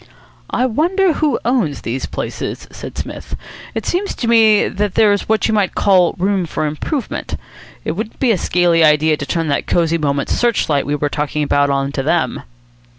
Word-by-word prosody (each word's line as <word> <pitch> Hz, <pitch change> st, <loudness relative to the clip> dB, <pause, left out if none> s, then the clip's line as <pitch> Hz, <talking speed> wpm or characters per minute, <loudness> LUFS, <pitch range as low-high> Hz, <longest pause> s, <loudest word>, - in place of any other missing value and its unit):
"I 250 Hz, -, +1 dB
wonder 345 Hz, -, +2 dB
who 305 Hz, -2 st, +1 dB
owns 225 Hz, -, 0 dB
these 125 Hz, +3 st, -3 dB
places," -, -, -5 dB
said -, -, -9 dB
Psmith. -, -, -6 dB, 0.4 s
"It -, -, -3 dB
seems 380 Hz, +3 st, -1 dB
to 235 Hz, -, -3 dB
me 220 Hz, -2 st, +5 dB
that 205 Hz, -1 st, -2 dB
there's 205 Hz, -2 st, +3 dB
what 220 Hz, 0 st, +2 dB
you 220 Hz, -, 0 dB
might 205 Hz, -3 st, +1 dB
call 185 Hz, -4 st, +3 dB
room 190 Hz, -1 st, 0 dB
for 155 Hz, -, -2 dB
improvement. 155 Hz, -, -3 dB, 0.5 s
It -, -, 0 dB
wouldn't 215 Hz, +7 st, -5 dB
be 255 Hz, -3 st, +3 dB
a 210 Hz, -, +2 dB
scaly 170 Hz, -1 st, +2 dB
idea 155 Hz, 0 st, +4 dB
to 145 Hz, -, -5 dB
turn 165 Hz, -2 st, -1 dB
that 140 Hz, -, -1 dB
Cosy 170 Hz, -1 st, +1 dB
Moments 140 Hz, -2 st, -1 dB
search 240 Hz, -3 st, +1 dB
light 140 Hz, -3 st, +1 dB
we 145 Hz, -, 0 dB
were 145 Hz, 0 st, -1 dB
talking 150 Hz, +1 st, -2 dB
about 145 Hz, 0 st, +2 dB
on 140 Hz, 0 st, 0 dB
to 140 Hz, -, -2 dB
them." -, -, 0 dB
175 Hz, 190 wpm, -17 LUFS, 150-225 Hz, 0.5 s, me